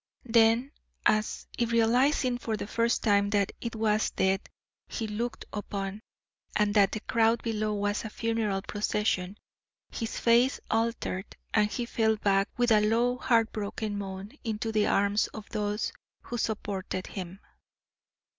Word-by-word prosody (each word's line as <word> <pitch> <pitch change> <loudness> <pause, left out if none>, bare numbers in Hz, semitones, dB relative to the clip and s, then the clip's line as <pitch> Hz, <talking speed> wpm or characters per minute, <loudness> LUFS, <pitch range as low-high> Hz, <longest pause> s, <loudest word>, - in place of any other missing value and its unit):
Then, 230 +3 +4 0.3
as 215 0 +1
if 235 -1 +1
realising 245 +2 +3
for 225 -3 -2
the - - -4
first 230 +2 0
time 200 -2 +3
that 205 -2 +1
it 235 -1 -4
was 215 -1 +2
death 190 +1 +1 0.5
he 225 - -3
looked 225 +3 -3
upon, 200 0 -4 0.5
and 210 -1 +2
that 200 -2 +4
the 215 - -3
crowd 230 +1 +2
below 215 -2 -1
was 205 0 -1
a 220 - -5
funeral 220 -3 -1
procession, 205 -2 -1 0.5
his 225 -2 -4
face 240 +3 +4
altered 225 -4 -1 0.2
and 210 -1 +4
he 240 - -2
fell 220 -2 +2
back 200 -1 +2
with 245 -1 +2
a 215 -1 +6
low 235 +4 +2
heartbroken 220 -3 0
moan 195 0 -5
into 225 -1 -2
the 215 -1 +2
arms 200 +2 +2
of 215 -1 -8
those 210 0 -2 0.3
who - - -6
supported 200 -4 -3
him. 185 -1 -7
215 Hz, 145 wpm, -29 LUFS, 205-230 Hz, 0.5 s, a